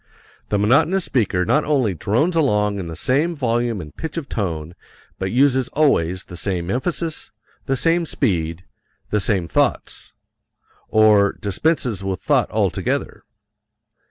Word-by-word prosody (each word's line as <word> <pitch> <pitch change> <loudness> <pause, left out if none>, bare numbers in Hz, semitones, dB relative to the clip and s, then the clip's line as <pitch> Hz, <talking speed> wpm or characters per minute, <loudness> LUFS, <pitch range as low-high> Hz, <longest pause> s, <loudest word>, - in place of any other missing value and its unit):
The 105 - +1
monotonous 150 - +3
speaker 100 -8 0
not 150 +10 +2
only 130 -9 +1
drones 120 - 0
along 105 -9 +1
in 90 - -5
the 80 - -6
same 145 - +1
volume 120 -5 -1
and 75 -3 -10
pitch 160 0 -6
of 155 -4 -4
tone 85 - -3 0.5
but 95 - -2
uses 130 0 +3
always 95 - +2
the 90 - -10
same 90 -1 -2
emphasis, 160 - -2 0.4
the 135 - +1
same 165 +3 +2
speed, 85 - -1 0.5
the 105 - +2
same 95 -5 0
thoughts - - -1 0.8
or 105 -2 +4
dispenses 110 - -1
with 95 -2 -3
thought - - +1
altogether. - - -2
110 Hz, 135 wpm, -21 LUFS, 95-145 Hz, 0.8 s, or